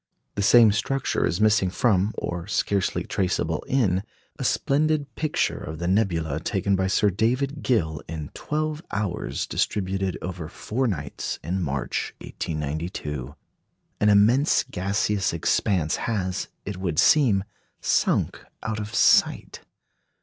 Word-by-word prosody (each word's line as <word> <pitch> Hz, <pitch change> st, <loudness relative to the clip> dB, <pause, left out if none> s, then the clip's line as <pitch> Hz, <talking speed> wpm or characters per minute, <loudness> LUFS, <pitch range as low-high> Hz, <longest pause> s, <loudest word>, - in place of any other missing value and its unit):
The 100 Hz, -, -2 dB
same 115 Hz, +1 st, +7 dB
structure 135 Hz, +6 st, 0 dB
is 85 Hz, -, -1 dB
missing 105 Hz, -3 st, +3 dB
from, 100 Hz, 0 st, +1 dB
or 90 Hz, 0 st, -4 dB
scarcely 100 Hz, -2 st, 0 dB
traceable 85 Hz, -4 st, -1 dB
in, 100 Hz, -9 st, +2 dB, 0.4 s
a -, -, -2 dB
splendid 145 Hz, -1 st, +1 dB
picture 155 Hz, +3 st, -1 dB
of 80 Hz, +1 st, -6 dB
the 85 Hz, +2 st, -3 dB
nebula 85 Hz, -7 st, +1 dB
taken 95 Hz, +4 st, 0 dB
by 95 Hz, 0 st, +1 dB
Sir 100 Hz, +2 st, +2 dB
David 130 Hz, +8 st, 0 dB
Gill 80 Hz, -, 0 dB
in 80 Hz, -2 st, -6 dB
twelve 155 Hz, 0 st, -2 dB
hours 100 Hz, -3 st, -2 dB
distributed 95 Hz, -2 st, -1 dB
over 90 Hz, -3 st, -5 dB
four 125 Hz, +8 st, -2 dB
nights 75 Hz, -, -3 dB
in 90 Hz, +5 st, -2 dB
March, 70 Hz, -5 st, -2 dB
1892. 75 Hz, -3 st, -4 dB, 0.6 s
An 105 Hz, -, +4 dB
immense 115 Hz, +9 st, +4 dB
gaseous 100 Hz, +1 st, -1 dB
expanse 85 Hz, 0 st, +1 dB
has, 95 Hz, -5 st, -2 dB, 0.2 s
it 100 Hz, -2 st, -5 dB
would 90 Hz, -4 st, -3 dB
seem, 115 Hz, -, +4 dB, 0.4 s
sunk -, -, +1 dB, 0.2 s
out 110 Hz, 0 st, -2 dB
of 105 Hz, +2 st, -5 dB
sight. -, -, +3 dB
95 Hz, 130 wpm, -25 LUFS, 85-110 Hz, 0.6 s, same